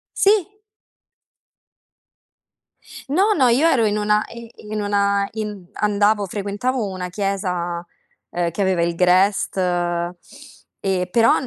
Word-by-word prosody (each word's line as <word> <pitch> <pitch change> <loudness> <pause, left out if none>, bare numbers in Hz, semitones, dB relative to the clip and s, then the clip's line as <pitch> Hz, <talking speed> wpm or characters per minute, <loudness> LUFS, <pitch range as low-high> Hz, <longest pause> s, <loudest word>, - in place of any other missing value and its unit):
Sì. 410 0 +2 2.5
No, 390 +8 +3
no, 260 -5 +4
io 275 +8 +4
ero 235 -8 +3
in 210 0 +1
una 210 0 +2
i 230 -1 -10 0.2
in 215 -1 -2
una 200 -1 +1
in 215 -1 -3
mhmm, 195 -4 -10
andavo 210 0 +2
frequentavo 205 +5 -2
una 185 -1 -5
chiesa, 180 -3 -2 0.4
uhm, 175 -1 -1
che 200 - -4
aveva 190 -3 +2
il 170 0 0
Grest, 185 +3 +2
ehm, 175 -1 -1 1.0
però 230 +1 +5
200 Hz, 120 wpm, -21 LUFS, 180-220 Hz, 2.5 s, però